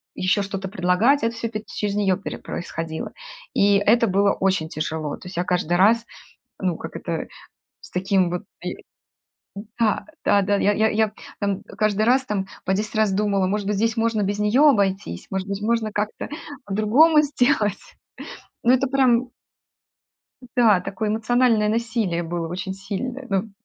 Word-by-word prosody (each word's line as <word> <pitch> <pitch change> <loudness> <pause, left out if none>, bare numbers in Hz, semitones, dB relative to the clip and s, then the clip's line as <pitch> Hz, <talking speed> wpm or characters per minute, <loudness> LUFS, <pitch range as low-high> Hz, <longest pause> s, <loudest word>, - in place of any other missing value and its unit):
еще 185 +2 +1
что-то 195 -1 -4
предлагать. 195 +8 +2
Это 230 0 0
всё 230 0 -3
пет 215 -1 -6
через 205 -1 -3
нее 195 -3 +2
пере 195 - -6
происходило. 165 -1 -5 0.4
И 200 0 +4
это 230 +4 +3
было 200 +1 +3
очень 190 -5 0
тяжело. 155 -1 -3
То - - -12
есть, 180 -1 -9
я 175 - +1
каждый 175 -1 0
раз, 220 +5 +4 0.6
ну, 180 -3 0
как - - -8
это, - - -4 0.6
с - - -13
таким 190 -1 +1
вот, 180 0 -4 0.2
и - - -3 1.0
да-да-да, 210 -3 +1
я 205 +1 +2
я 220 +1 +3
я, 215 -1 +1 0.3
там, 200 -2 -1
каждый 215 -1 -1
раз, 260 +3 +3
там, 200 -4 -2 0.2
по 190 - +2
10 210 +1 -3
раз 215 -3 +3
думала: 200 -1 +1
"Может 205 +1 -1
быть, 205 0 0
здесь 225 +3 0
можно 225 -1 +1
без 200 +1 -1
нее 210 +6 +2
обойтись? 195 - 0
Может 190 0 -3
быть, 200 +1 -4
можно 225 -1 0
как-то 210 +1 -3 0.4
по-другому 240 +11 +4
сделать?" 250 -7 +1 0.9
Но 240 - +5
это 270 +1 +1
прям 255 -2 +2 1.3
Да, 225 -6 +5
такое 200 +3 -3
эмоциональное 225 0 +2
насилие 220 -6 -1
было 170 0 -3
очень 185 +3 -4
сильное. 245 +7 -5
Ну, 195 +2 -1
205 Hz, 160 wpm, -23 LUFS, 190-230 Hz, 1.3 s, Но